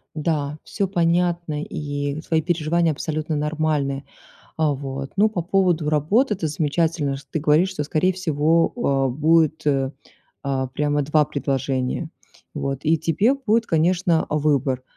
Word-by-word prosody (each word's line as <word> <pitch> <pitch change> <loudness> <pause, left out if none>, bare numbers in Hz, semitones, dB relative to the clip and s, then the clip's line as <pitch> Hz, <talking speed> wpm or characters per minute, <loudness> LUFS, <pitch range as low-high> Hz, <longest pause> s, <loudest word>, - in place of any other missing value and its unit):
Да, 150 -2 -1
всё 200 - -2
понятно, 170 -3 0
и 145 -1 -4
твои 160 0 0
переживания 165 0 +1
абсолютно 155 +1 -3
нормальны. 150 -2 -1 0.5
А 155 -2 +2
вот, 135 0 -5
ну, 215 +2 +5
по 190 -5 -2
поводу 175 -3 +1
работы, 200 - +2
это 175 -5 -2
замечательно, 155 -1 0
что 140 0 -14
ты 160 - -1
говоришь, 155 +5 +3
что 185 -6 -3
скорее 155 +5 +1
всего, 165 -2 +1
а, 140 - +1
будет, 155 +3 +2
э, 135 -2 +1 0.5
а, 135 -2 -1
прямо 145 +2 0
2 150 +2 +3
предложения, 135 +1 -2 0.4
вот, 140 -3 -3
и 160 +2 +3
тебе 180 - +2
будет, 230 -4 +1
конечно, 170 0 +2
выбор. 140 -4 +1
155 Hz, 140 wpm, -22 LUFS, 145-170 Hz, 0.5 s, ну